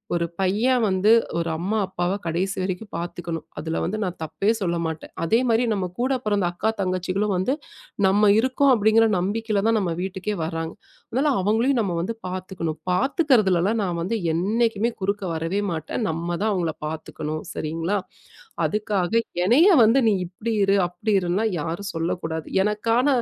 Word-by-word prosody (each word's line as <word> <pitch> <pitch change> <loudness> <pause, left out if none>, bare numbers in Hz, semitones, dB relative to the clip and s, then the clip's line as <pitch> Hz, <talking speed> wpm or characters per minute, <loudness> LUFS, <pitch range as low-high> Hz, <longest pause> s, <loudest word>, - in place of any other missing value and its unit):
ஒரு 170 0 +1
பையன் 220 +7 +2
வந்து 190 +2 +3 0.3
ஒரு 170 0 -1
அம்மா 195 +7 -1
அப்பாவ 185 +1 -1
கடைசி 180 +4 -1
வரைக்கும் 185 +3 -3
பார்த்துக்கணும், 170 -1 -5
அதுல 160 +1 -3
வந்து 205 +5 -2
நான் 180 -2 -3
தப்பே 160 +6 -1
சொல்ல 170 -4 -1
மாட்டேன். 160 -1 -5
அதேமாதிரி 230 +4 +2
நம்ம 195 -3 -1
கூட 260 +2 +1
பிறந்த 205 -3 +1
அக்கா, 190 +5 -1
தங்கச்சிகளும் 185 +2 -1
வந்து 190 +9 +1 0.5
நம்ம 205 +2 +4
இருக்கோம் 260 +3 +3
அப்பிடிங்கிற 220 0 +4
நம்பிக்கையில 205 +2 -1
தான் 225 0 +3
நம்ம 180 -4 -1
வீட்டுக்கே 190 +2 -3
வராங்க, 165 0 -4 0.4
அதனால, 275 +5 +2
அவுங்களையும் 230 +7 +2
நம்ம 190 -5 -1
வந்து 225 +7 -3
பார்த்துக்கணும் 180 -4 -4
பார்த்துக்கிறதுலலாம் 220 - +2
நான் 175 -3 -2
வந்து 195 +7 -1 0.2
என்னைக்குமே 225 +5 +1
குறுக்க 200 +1 -1
வரவே 165 +5 -1
மாட்டேன். 160 +7 -3
நம்ம 170 +2 -2
தான் 220 - +2
அவுங்கள 170 -4 -1
பார்த்துக்கணும். 155 0 -5
சரிங்களா? 165 +6 -2 0.7
அதுக்காக 210 +1 0 0.2
எனைய 305 - +6
வந்து 225 +5 +5
நீ - - +3
இப்பிடி 210 +6 -4
இரு! 195 +1 +3
அப்பிடி 180 +5 -2
இருன்லாம் 190 +5 0
யாரும் 170 +6 -4
சொல்லக்கூடாது. 165 -1 -3 0.2
எனக்கான 225 +5 +1
195 Hz, 150 wpm, -23 LUFS, 175-220 Hz, 0.7 s, எனைய